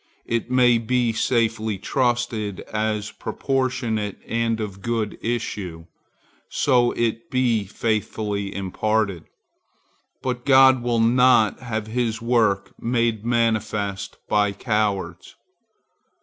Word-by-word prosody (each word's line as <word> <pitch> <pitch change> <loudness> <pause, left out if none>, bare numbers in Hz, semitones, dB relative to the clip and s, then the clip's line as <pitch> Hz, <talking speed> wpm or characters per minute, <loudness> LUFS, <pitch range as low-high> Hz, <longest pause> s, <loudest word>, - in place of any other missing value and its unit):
It 115 0 -2
may 125 -2 +4
be 120 0 +1
safely 110 -2 0
trusted 120 -4 -1
as 110 0 -1
proportionate 120 -6 -2
and 115 -1 0
of 100 -3 -5
good 115 -1 -2
issues, 100 -8 -4 0.6
so 125 -3 +2
it 115 -1 -2
be 120 -5 +1
faithfully 105 -1 -2
imparted, 100 -2 -1 1.0
but 125 -1 -2
God 130 -2 +6
will 120 -1 0
not 120 -1 +4
have 110 -3 -4
his 115 0 -1
work 115 -4 +1
made 115 -2 0
manifest 110 -4 -1
by 105 -1 +2
cowards. 105 -3 -2
115 Hz, 100 wpm, -23 LUFS, 105-120 Hz, 1.0 s, God